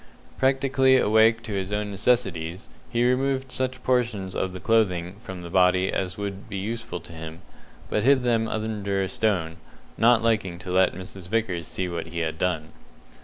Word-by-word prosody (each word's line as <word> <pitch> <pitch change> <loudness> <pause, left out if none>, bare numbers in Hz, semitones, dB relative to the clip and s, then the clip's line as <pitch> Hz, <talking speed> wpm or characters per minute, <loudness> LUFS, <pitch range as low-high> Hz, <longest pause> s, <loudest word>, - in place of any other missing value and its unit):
Practically 135 0 +3
awake 110 0 +4
to 110 - -5
his 95 0 -2
own 105 0 -2
necessities, 95 -5 0 0.2
he 120 0 +1
removed 130 +1 +1
such 130 0 -2
portions 115 -7 0
of 95 -1 -2
clothing 95 -5 +1
from 95 -6 -8
the 85 - -7
body 90 0 +3
as 95 -1 -2
would 100 +1 -5
be 100 - -4
useful 110 -1 -4
to 85 +1 -13
him, 80 +2 -8 0.4
but 105 - 0
hid 130 +2 +4
them 115 -2 +2
under 105 -3 -2
a - - -1
stone, 90 -7 -1 0.4
not 115 0 +5
liking 110 -6 +1
to 90 +1 -7
let 95 -1 +3
Mrs. 95 0 -9
Vickers 95 -6 -1
see 90 - -3
what 85 -2 -4
he 85 0 -4
had 80 0 -3
done. 80 -4 -1
100 Hz, 170 wpm, -25 LUFS, 90-115 Hz, 0.4 s, not